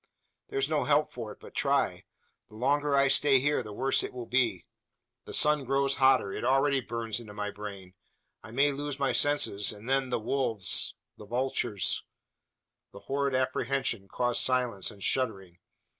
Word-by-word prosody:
There's 135 Hz, 0 st, -1 dB
no 155 Hz, -1 st, 0 dB
help 150 Hz, +1 st, +2 dB
for 115 Hz, -3 st, -7 dB
it -, -, -13 dB
but -, -, -13 dB
try. -, -, 0 dB, 0.4 s
The 105 Hz, -, -15 dB
longer 145 Hz, +4 st, +1 dB
I 140 Hz, 0 st, +4 dB
stay 140 Hz, 0 st, +5 dB
here, 145 Hz, +1 st, +1 dB
the 105 Hz, -3 st, -9 dB
worse 135 Hz, +6 st, +1 dB
it -, -, -5 dB
will 125 Hz, -2 st, -6 dB
be. 120 Hz, +1 st, 0 dB, 0.6 s
The -, -, -9 dB
sun 150 Hz, -1 st, +3 dB
grows 135 Hz, +1 st, 0 dB
hotter. 130 Hz, -7 st, +3 dB
It -, -, -5 dB
already 135 Hz, +2 st, +2 dB
burns 115 Hz, -2 st, -4 dB
into 105 Hz, -3 st, -11 dB
my 105 Hz, 0 st, -3 dB
brain. 100 Hz, -3 st, -9 dB, 0.5 s
I -, -, -12 dB
may 140 Hz, +5 st, +2 dB
lose 145 Hz, 0 st, -4 dB
my 140 Hz, -1 st, +1 dB
senses, 145 Hz, -8 st, +2 dB
and 105 Hz, +2 st, -11 dB
then 135 Hz, 0 st, +1 dB
the 125 Hz, -, 0 dB
wolves 110 Hz, -5 st, 0 dB, 0.2 s
the 105 Hz, -, -12 dB
vultures 120 Hz, -3 st, 0 dB, 0.5 s
" -, -, -60 dB
The -, -, -11 dB
horrid 140 Hz, -1 st, -1 dB
apprehension 130 Hz, -4 st, -1 dB
caused 120 Hz, +3 st, 0 dB
silence 125 Hz, -7 st, +1 dB
and 100 Hz, -3 st, -11 dB
shuddering. 95 Hz, -9 st, -1 dB
130 Hz, 175 wpm, -29 LUFS, 110-140 Hz, 0.6 s, stay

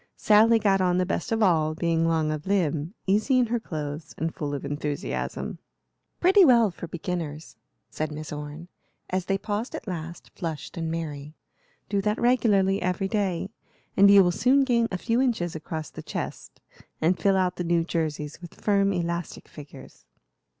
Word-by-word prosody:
Sally 220 Hz, +2 st, +5 dB
got 195 Hz, -3 st, +2 dB
on 180 Hz, -1 st, +2 dB
the 185 Hz, -, +2 dB
best 190 Hz, -, -3 dB
of 225 Hz, -1 st, +2 dB
all, 155 Hz, -5 st, +2 dB
being 165 Hz, 0 st, +1 dB
long 160 Hz, -2 st, +1 dB
of 155 Hz, +3 st, -5 dB
limb, 170 Hz, -2 st, 0 dB
easy 215 Hz, +7 st, +2 dB
in 250 Hz, -, +4 dB
her 240 Hz, +1 st, -1 dB
clothes, 155 Hz, -5 st, -6 dB
and 160 Hz, +1 st, -2 dB
full 145 Hz, -2 st, -3 dB
of 140 Hz, -, -6 dB
enthusiasm. 145 Hz, 0 st, -4 dB, 0.6 s
"Pretty 385 Hz, +3 st, +6 dB
well 235 Hz, -, +5 dB
for 170 Hz, -, -8 dB
beginners," 165 Hz, -2 st, -5 dB, 0.4 s
said 155 Hz, 0 st, -3 dB
Miss 155 Hz, 0 st, -6 dB
Orne, 150 Hz, +3 st, -7 dB, 0.4 s
as 185 Hz, -1 st, -1 dB
they 195 Hz, -, 0 dB
paused 210 Hz, +4 st, -3 dB
at -, -, -8 dB
last, 170 Hz, -2 st, -6 dB
flushed 155 Hz, -4 st, -5 dB
and 165 Hz, -2 st, -3 dB
merry. 155 Hz, -2 st, -5 dB, 0.5 s
"Do 200 Hz, -1 st, 0 dB
that 210 Hz, +2 st, 0 dB
regularly 205 Hz, -6 st, +3 dB
every 185 Hz, +2 st, -1 dB
day, 195 Hz, -2 st, -1 dB, 0.4 s
and 200 Hz, +1 st, +7 dB
you 200 Hz, -1 st, +8 dB
will 175 Hz, -, +2 dB
soon 260 Hz, +9 st, +3 dB
gain 235 Hz, -3 st, +2 dB
a 185 Hz, -, -1 dB
few 230 Hz, +6 st, 0 dB
inches 215 Hz, -11 st, 0 dB
across 155 Hz, 0 st, -5 dB
the -, -, -8 dB
chest -, -, -6 dB, 0.4 s
and 170 Hz, +2 st, +2 dB
fill 195 Hz, +3 st, +3 dB
out 185 Hz, -1 st, 0 dB
the 180 Hz, -, -2 dB
new 170 Hz, -1 st, +2 dB
jerseys 155 Hz, -2 st, -3 dB
with 175 Hz, -, -11 dB
firm, 200 Hz, -1 st, +2 dB
elastic 170 Hz, -2 st, -3 dB
figures." 140 Hz, -, -13 dB
175 Hz, 175 wpm, -26 LUFS, 155-205 Hz, 0.6 s, you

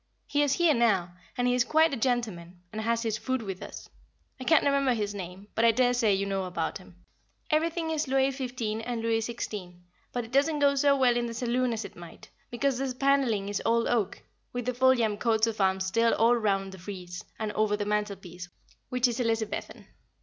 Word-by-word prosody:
He 290 Hz, -, +1 dB
is 290 Hz, -2 st, +3 dB
here 345 Hz, -3 st, +4 dB
now, 195 Hz, -8 st, +2 dB, 0.2 s
and 245 Hz, 0 st, +1 dB
he 245 Hz, -, +3 dB
is 250 Hz, 0 st, +3 dB
quite 315 Hz, +3 st, +3 dB
a -, -, +1 dB
gentleman, 215 Hz, -8 st, -2 dB
and 215 Hz, -, -3 dB
has 230 Hz, +1 st, 0 dB
his 220 Hz, -2 st, -1 dB
food 260 Hz, -2 st, -2 dB
with 190 Hz, -3 st, -6 dB
us; -, -, -9 dB, 0.5 s
I -, -, -5 dB
can't 320 Hz, 0 st, +4 dB
remember 275 Hz, -3 st, +2 dB
his 205 Hz, -2 st, -2 dB
name, 190 Hz, +1 st, -8 dB
but 225 Hz, -, 0 dB
I 230 Hz, -, +7 dB
daresay 245 Hz, -1 st, +3 dB
you 195 Hz, +1 st, -1 dB
know 195 Hz, -1 st, -2 dB
about 170 Hz, -2 st, -3 dB
him. 185 Hz, -1 st, -16 dB, 0.6 s
Everything 325 Hz, +1 st, +1 dB
is 310 Hz, -2 st, -1 dB
Louis 270 Hz, +1 st, +2 dB
XV. 245 Hz, -5 st, -3 dB
and 235 Hz, -1 st, -3 dB
Louis 225 Hz, 0 st, +2 dB
XVI., 205 Hz, -6 st, -5 dB, 0.4 s
but 245 Hz, -2 st, -3 dB
it 225 Hz, -, -14 dB
doesn't 285 Hz, +4 st, +2 dB
go 285 Hz, -1 st, +4 dB
so 280 Hz, 0 st, +3 dB
well 250 Hz, -2 st, +4 dB
in 240 Hz, 0 st, 0 dB
the 230 Hz, -, -6 dB
saloon 245 Hz, +1 st, 0 dB
as 225 Hz, -1 st, -3 dB
it -, -, -10 dB
might, 170 Hz, -1 st, -12 dB, 0.2 s
because 260 Hz, +1 st, 0 dB
the 265 Hz, -2 st, -2 dB
panelling 260 Hz, -7 st, +2 dB
is 205 Hz, -1 st, -2 dB
old 230 Hz, 0 st, +2 dB
oak, 220 Hz, -5 st, -1 dB, 0.3 s
with 245 Hz, -1 st, -3 dB
the 250 Hz, -, 0 dB
Foljambe 240 Hz, -4 st, +3 dB
coats 225 Hz, -2 st, +3 dB
of 220 Hz, -2 st, -3 dB
arms 190 Hz, 0 st, +2 dB
still 230 Hz, +5 st, +2 dB
all 230 Hz, +2 st, +4 dB
round 195 Hz, -4 st, 0 dB
the 190 Hz, -, -11 dB
frieze, 180 Hz, -1 st, -7 dB
and 215 Hz, -1 st, -3 dB
over 210 Hz, 0 st, +1 dB
the 205 Hz, -, -2 dB
mantelpiece, 200 Hz, -4 st, -3 dB, 0.4 s
which 250 Hz, 0 st, +2 dB
is 240 Hz, +1 st, -3 dB
Elizabethan. 225 Hz, -3 st, -2 dB
230 Hz, 210 wpm, -28 LUFS, 205-255 Hz, 0.6 s, I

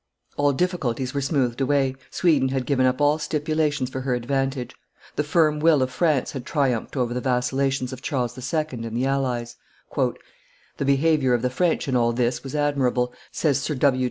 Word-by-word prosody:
All 145 Hz, 0 st, +3 dB
difficulties 135 Hz, -6 st, -1 dB
were 140 Hz, -, -1 dB
smoothed 135 Hz, -3 st, 0 dB
away 135 Hz, -1 st, +2 dB, 0.2 s
Sweden 150 Hz, -7 st, +2 dB
had 130 Hz, -1 st, -1 dB
given 130 Hz, -2 st, +2 dB
up 130 Hz, 0 st, 0 dB
all 145 Hz, +1 st, +3 dB
stipulations 150 Hz, -3 st, -1 dB
for 130 Hz, -, -4 dB
her 130 Hz, -1 st, 0 dB
advantage; 135 Hz, +1 st, -2 dB, 0.4 s
the 150 Hz, -, +1 dB
firm 150 Hz, 0 st, +2 dB
will 155 Hz, -3 st, +4 dB
of 130 Hz, -, -2 dB
France 155 Hz, -5 st, +1 dB
had 135 Hz, -3 st, -6 dB
triumphed 135 Hz, -3 st, -1 dB
over 120 Hz, -2 st, 0 dB
the 125 Hz, -, -2 dB
vacillations 130 Hz, +1 st, 0 dB
of 130 Hz, -, -8 dB
Charles 125 Hz, -5 st, -2 dB
II. 145 Hz, +5 st, -1 dB
and 115 Hz, -2 st, -5 dB
the 130 Hz, -, +1 dB
allies. 125 Hz, -3 st, -1 dB, 0.4 s
"The 140 Hz, -, -5 dB
behavior 140 Hz, -2 st, +3 dB
of 120 Hz, -, -2 dB
the 125 Hz, -, +1 dB
French 165 Hz, +3 st, 0 dB
in 130 Hz, -, 0 dB
all 120 Hz, -1 st, +2 dB
this 120 Hz, +1 st, 0 dB
was 135 Hz, +2 st, -6 dB
admirable," 130 Hz, -4 st, +1 dB, 0.2 s
says 140 Hz, -4 st, +1 dB
Sir 150 Hz, +1 st, -2 dB
W. 130 Hz, -1 st, +2 dB
135 Hz, 185 wpm, -24 LUFS, 125-145 Hz, 0.4 s, will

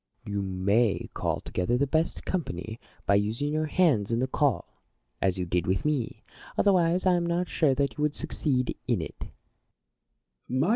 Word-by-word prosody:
Plato. 105 Hz, -, -5 dB
You 100 Hz, -, 0 dB
may 100 Hz, +4 st, +1 dB
call -, -, -1 dB
together 115 Hz, +7 st, 0 dB
the 140 Hz, -, +2 dB
best 160 Hz, +4 st, 0 dB
company, 110 Hz, -, -3 dB, 0.3 s
by 100 Hz, -, +3 dB
using 110 Hz, +9 st, +1 dB
your 155 Hz, 0 st, 0 dB
hands 145 Hz, -, +2 dB
in 115 Hz, -, +2 dB
the 130 Hz, -, +2 dB
call, 130 Hz, -1 st, -1 dB, 0.4 s
as 95 Hz, -1 st, +2 dB
you 90 Hz, -, -1 dB
did 90 Hz, 0 st, 0 dB
with 95 Hz, +7 st, 0 dB
me; 145 Hz, -6 st, -1 dB, 0.3 s
otherwise 180 Hz, -2 st, +3 dB
I 185 Hz, -, +5 dB
am 175 Hz, -1 st, +1 dB
not 175 Hz, +1 st, 0 dB
sure 145 Hz, -5 st, +2 dB
that 140 Hz, +2 st, -1 dB
you -, -, -1 dB
would 150 Hz, 0 st, +1 dB
succeed 135 Hz, -5 st, -1 dB
in 120 Hz, -6 st, +2 dB
it. 80 Hz, -2 st, -6 dB
130 Hz, 175 wpm, -28 LUFS, 100-155 Hz, 0.4 s, I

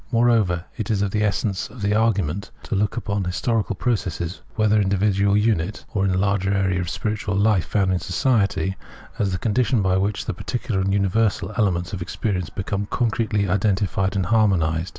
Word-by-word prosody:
Moreover, 115 Hz, -8 st, +2 dB
it 110 Hz, -4 st, -4 dB
is 100 Hz, -3 st, +1 dB
of 100 Hz, -, -1 dB
the 105 Hz, -, 0 dB
essence 100 Hz, -2 st, -1 dB
of 115 Hz, -, -10 dB
the 100 Hz, +1 st, +2 dB
argument 100 Hz, -4 st, 0 dB
to -, -, -5 dB
look 105 Hz, +3 st, 0 dB
upon 100 Hz, -4 st, -1 dB
historical 105 Hz, +4 st, -1 dB
process, 95 Hz, -6 st, -2 dB
whether 110 Hz, -1 st, +3 dB
in 95 Hz, -, +1 dB
the 100 Hz, -, +2 dB
individual 100 Hz, 0 st, +2 dB
unit, 105 Hz, -2 st, 0 dB
or 100 Hz, -2 st, +1 dB
in 95 Hz, -, +2 dB
the 90 Hz, -, +1 dB
larger 100 Hz, 0 st, +1 dB
area 95 Hz, -2 st, +1 dB
of 85 Hz, -, -4 dB
spiritual 105 Hz, -2 st, -2 dB
life 100 Hz, -3 st, +3 dB
found 95 Hz, -3 st, +1 dB
in 90 Hz, -, 0 dB
society, 100 Hz, -2 st, +1 dB, 0.4 s
as 100 Hz, -2 st, +1 dB
the 90 Hz, -, -1 dB
condition 115 Hz, +2 st, +1 dB
by 95 Hz, 0 st, +2 dB
which 100 Hz, +2 st, -1 dB
the 110 Hz, -, -2 dB
particular 105 Hz, +1 st, -2 dB
and 95 Hz, +1 st, 0 dB
universal 100 Hz, 0 st, +1 dB
elements 90 Hz, -6 st, 0 dB
of 95 Hz, -, -4 dB
experience 90 Hz, -1 st, -2 dB
become 100 Hz, +1 st, -3 dB
concretely 110 Hz, -3 st, 0 dB
identified 100 Hz, 0 st, 0 dB
and 95 Hz, -2 st, +1 dB
harmonised. 90 Hz, -6 st, +2 dB
100 Hz, 190 wpm, -22 LUFS, 95-110 Hz, 0.4 s, whether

